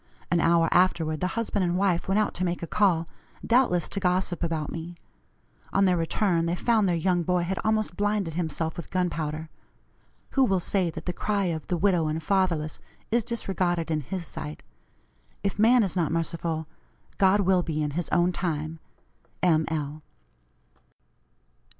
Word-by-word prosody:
An 175 - +3
hour 165 0 +4
afterward 165 -4 +2
the 180 - 0
husband 215 -3 0
and 175 0 +1
wife 185 -3 +1
went 195 +1 +2
out 215 - +1
to 185 - -2
make 175 -1 -2
a - - 0
call, 170 -3 +2 0.4
doubtless 230 -9 +3
to 200 - -2
gossip 180 -1 0
about 165 -3 -2
me; 170 +1 -6 0.8
on 195 - +3
their 180 -1 +3
return 170 0 +1
they 170 - 0
found 215 0 +2
their 175 - +2
young 175 +1 +1
boy 180 +1 +1
had 185 +2 -2
almost 215 -4 0
blinded 205 -5 0
himself 160 0 -2
with 170 - -7
gunpowder. 160 -4 -2 0.8
Who 270 - +3
will 195 -7 +2
say 180 0 0
that 160 0 -8
the 180 - -2
cry 200 0 0
of 160 -2 -6
the 180 - 0
'widow 175 -3 +2
and 155 +1 -1
fatherless' 170 -4 0 0.3
is 235 0 +2
disregarded 185 -7 -1
in 155 -1 0
His 175 +5 -5
sight! 75 - -7 0.8
If 200 +1 -2
man 235 +2 +6
is 190 - -2
not 170 -4 +1
merciful, 165 -1 -2 0.5
God 195 +1 +5
will 185 -1 +3
be 155 -3 -2
in 150 - -2
his 170 +3 -3
own 175 +1 +3
time. 160 -2 -3 0.6
M. 160 -3 +4
L." 155 -1 -3
175 Hz, 170 wpm, -26 LUFS, 160-195 Hz, 0.8 s, man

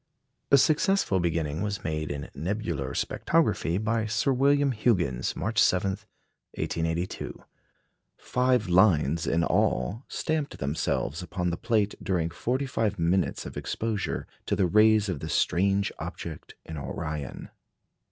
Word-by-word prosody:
A 140 - +7
successful 155 - +3
beginning 80 -2 -1
was 105 -1 -3
made 80 -1 -2
in 70 0 -4
nebular 85 - -3
spectrography 85 +2 +1
by 110 +1 0
Sir 115 +5 +1
William 140 +2 +3
Huggins, 95 - 0
March 110 +5 +1
7, 95 +1 +3 0.6
1882. 85 +2 -3 0.7
Five 125 -3 +1
lines 85 -4 +3
in 85 +1 +2
all 95 - +1
stamped 155 -2 -2
themselves 70 +1 -1
upon 90 0 -2
the - - -1
plate 110 -1 +1
during 85 -4 0
forty 125 +10 -1
five 110 -5 -1
minutes 85 +2 0
of - - -8
exposure 110 -2 -2 0.2
to - - +1
the 95 - +2
rays 105 +3 +5
of 90 -7 -2
the - - -5
strange 100 +2 +2
object - - -7
in 80 - -7
Orion. 75 +1 -5
95 Hz, 130 wpm, -27 LUFS, 80-110 Hz, 0.7 s, A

